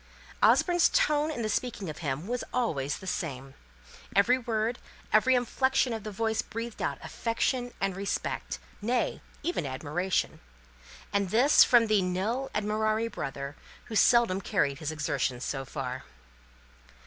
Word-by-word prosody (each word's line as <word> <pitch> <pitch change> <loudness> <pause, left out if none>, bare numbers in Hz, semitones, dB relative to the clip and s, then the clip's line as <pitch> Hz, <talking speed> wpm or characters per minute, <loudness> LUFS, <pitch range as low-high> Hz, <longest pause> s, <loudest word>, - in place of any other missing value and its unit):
Osborne's 350 -2 +5
tone 305 -11 +2
in 235 -8 -2
speaking 215 -3 -2
of 155 -1 -6
him 145 0 -3
was 245 +3 -2
always 145 - -1
the - - -11
same: 135 -7 -4 0.6
every 240 +6 +4
word, 230 0 -1 0.3
every 255 +4 +5
inflection 260 +1 +1
of 220 -2 -5
the 215 - -5
voice 220 +2 0
breathed 230 0 -6
out - - -1
affection 245 +2 -1
and 195 -1 -1
respect 195 +1 -3 0.2
nay, 240 +4 0 0.2
even 350 - -1
admiration! 150 +7 -2 0.7
And 200 -2 +1
this 250 +9 +6
from 240 -2 +5
the 215 -2 +3
nil 205 +9 -1
admirari 215 +2 0
brother, 140 +1 -5 0.3
who 225 - -7
seldom 225 -4 +4
carried 140 -6 0
his 155 -1 -3
exertions 145 -5 -1
so 135 -1 -3
far. 130 -2 -5
215 Hz, 135 wpm, -29 LUFS, 155-240 Hz, 0.7 s, this